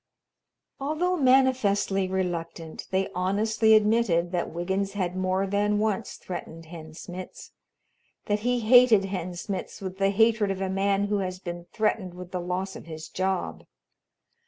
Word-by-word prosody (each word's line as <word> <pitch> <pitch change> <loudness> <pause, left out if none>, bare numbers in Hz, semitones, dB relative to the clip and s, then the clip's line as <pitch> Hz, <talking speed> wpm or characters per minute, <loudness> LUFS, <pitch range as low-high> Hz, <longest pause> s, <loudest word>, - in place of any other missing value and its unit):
Although 315 +6 0
manifestly 255 - +3
reluctant, 170 -3 -4
they 190 0 0
honestly 215 +4 +3
admitted 210 -6 +2
that 175 -2 -1
Wiggins 190 +3 -2
had 185 -3 -2
more 185 +1 0
than 205 +1 +1
once 215 0 -1
threatened 165 -2 -7
Hen 160 -1 -10
Smitz 180 +2 -9 0.7
that 205 0 0
he 245 +2 0
hated 230 -3 +6
Hen 185 -2 -4
Smitz 190 +2 -5
with 190 -1 -6
the 195 0 +3
hatred 220 0 +3
of 195 -1 -2
a 190 -1 -1
man 195 +1 +1
who 205 0 0
has 185 -1 -3
been 175 -1 -7
threatened 210 -4 -1
with 180 0 -9
the 180 - -3
loss 185 +2 -3
of - - -10
his 160 -1 -8
job. 190 0 -2
195 Hz, 150 wpm, -26 LUFS, 180-215 Hz, 0.7 s, hated